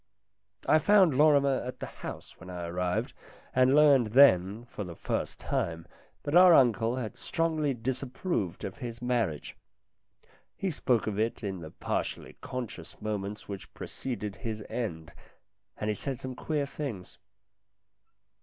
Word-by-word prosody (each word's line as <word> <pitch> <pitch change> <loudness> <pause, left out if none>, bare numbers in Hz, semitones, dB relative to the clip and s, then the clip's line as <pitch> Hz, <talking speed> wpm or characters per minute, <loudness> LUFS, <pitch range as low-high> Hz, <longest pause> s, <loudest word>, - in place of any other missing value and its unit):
I 155 - +6
found 190 -3 +5
Lorrimer 140 -2 +4
at 125 +1 -6
the - - -4 0.2
house - - -8
when 95 - -11
I 90 -1 -5
arrived, 90 +1 -1 0.4
and 130 +1 +4
learned 140 -7 +5
then, 110 -4 +5
for 105 - -6
the 90 -3 -8
first - - -3
time, 80 0 -2 0.4
that 145 - -3
our 180 -1 +9
uncle 115 -3 +4
had 120 -4 -5
strongly 155 -4 0
disapproved 125 - -3
of 95 - -5
his 120 -3 -6
marriage. 115 - -1 1.0
He 195 - -1
spoke 125 -6 +1
of 105 -1 -2
it 115 +1 -1
in 95 -3 -3
the 80 -2 -8
partially - - -4
conscious 125 -10 -6
moments 105 0 -4
which 100 -2 -7
preceded 105 -6 -5
his 110 -2 -5
end, 85 -9 -4 0.6
and 105 - -3
he 105 - +2
said 130 +4 -4
some 130 0 -5
queer 145 +2 -1
things. 135 -10 -6
120 Hz, 145 wpm, -29 LUFS, 100-140 Hz, 1.0 s, our